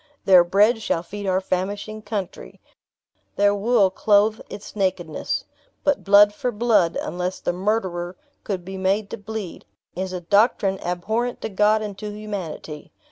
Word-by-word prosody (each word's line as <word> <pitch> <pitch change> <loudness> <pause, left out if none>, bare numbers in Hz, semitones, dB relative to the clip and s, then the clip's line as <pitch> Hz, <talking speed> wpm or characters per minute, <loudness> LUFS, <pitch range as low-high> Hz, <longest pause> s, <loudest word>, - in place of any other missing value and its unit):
Their 185 -3 +7
bread 210 +6 +3
shall 165 -5 -1
feed 205 +3 -7
our 185 0 +2
famishing 200 +3 -3
country; 210 -3 -6 0.8
their 205 0 +3
wool 205 -1 +3
clothe 210 +2 +3
its 200 - -9
nakedness. 185 -5 -2 0.4
But 285 -1 +1
blood 205 +1 +6
for 250 +2 -2
blood, 210 -6 +2
unless 180 +1 -3
the - - -1
murderer 185 -2 -2 0.3
could 185 -4 -4
be 190 +1 -6
made 200 +2 0
to - - -4
bleed, 210 -3 -6 0.3
is 185 +1 -3
a 180 - -3
doctrine 200 +1 +2
abhorrent 220 +8 -2
to - - -3
God 210 +2 +2
and 205 -2 -5
to 210 - -5
humanity. 195 -8 -7
200 Hz, 150 wpm, -23 LUFS, 185-215 Hz, 0.8 s, Their